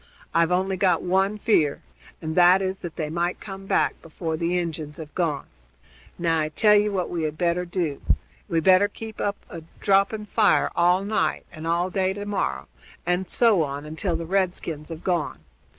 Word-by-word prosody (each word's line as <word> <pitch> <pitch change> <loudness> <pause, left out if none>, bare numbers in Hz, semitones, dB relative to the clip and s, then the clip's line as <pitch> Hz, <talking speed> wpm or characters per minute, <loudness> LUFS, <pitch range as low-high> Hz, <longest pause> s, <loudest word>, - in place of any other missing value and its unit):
I've 165 0 +3
only 190 +1 +1
got 180 -3 +2
one 190 +3 +1
fear, 160 -9 +2 0.4
and 160 0 -3
that 180 +1 +7
is 190 0 -2
that 170 -2 -7
they 155 -2 -3
might 175 +2 -1
come 195 -1 -9
back - - +1
before 165 0 -4
the 170 +2 0
Injuns 160 -3 -4
have 155 -2 -9
gone. 155 -6 -1 0.7
Now 165 -2 +1
I 155 0 0
tell 210 +7 +4
ye 210 0 +4
what 190 -3 -1
we 170 - -3
had 155 -1 -2
better 175 +1 0
do 170 -5 -2 0.5
we 165 -3 +1
better 185 +4 +5
keep 220 +1 -8
up 200 0 0
a 170 - -8 0.2
dropping 200 +2 +2
fire 210 0 +3
all 180 +3 +3
night 200 -7 0
and 155 +1 -7
all 175 +2 +1
day 190 0 +1
to 205 +1 -6
morrow, 70 - -2 0.4
and 180 +1 0
so 225 -7 +4
on, 145 -1 -3
until 160 +3 -2
the 165 0 -4
redskins 175 -4 -2
have 165 0 -8
gone. 175 -4 -1
175 Hz, 185 wpm, -24 LUFS, 160-195 Hz, 0.7 s, that